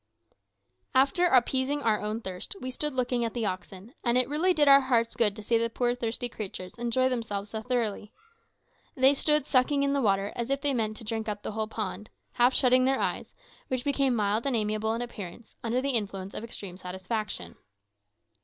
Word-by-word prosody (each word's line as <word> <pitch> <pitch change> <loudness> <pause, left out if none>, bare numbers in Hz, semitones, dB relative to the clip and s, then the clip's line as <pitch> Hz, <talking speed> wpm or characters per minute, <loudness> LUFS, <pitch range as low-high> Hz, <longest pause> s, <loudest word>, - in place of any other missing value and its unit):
After 350 +8 +4
appeasing 265 +1 +2
our 220 -2 +2
own 215 +2 -2
thirst 185 - -6
we 255 - -5
stood 300 +2 -1
looking 245 -1 0
at 230 0 -3
the 235 -2 -1
oxen, 190 +3 -6
and 240 0 +2
it 255 - +2
really 315 +6 +2
did 300 -4 +3
our 275 0 +8
hearts 235 -3 +1
good 210 -4 +2
to 215 - -9
see 230 +2 +2
the 230 0 0
poor 240 +1 0
thirsty 245 0 -2
creatures 190 -5 -6
enjoy 240 +2 +2
themselves 220 -5 -3
so 220 - -3
thoroughly. 220 -3 -2 0.8
They 265 +1 +5
stood 300 0 +2
sucking 280 +1 +2
in 280 0 +1
the 280 - +1
water 200 -2 +1
as 235 +1 -3
if 275 0 0
they 285 -1 +1
meant 215 -3 -1
to - - -11
drink 220 0 -3
up 205 0 -5
the - - -3
whole 215 0 -2
pond, 210 -2 -5 0.2
half 245 +1 +4
shutting 255 0 +5
their 270 0 +2
eyes, - - -2 0.3
which 255 -1 -2
became 275 -3 +1
mild 215 +3 +1
and 270 - +1
amiable 215 0 0
in 235 - -2
appearance 215 -2 -9
under 235 +2 0
the 275 +1 0
influence 200 -5 -2
of - - -5
extreme 200 -5 -7
satisfaction. 185 - -4
235 Hz, 200 wpm, -28 LUFS, 210-260 Hz, 0.8 s, our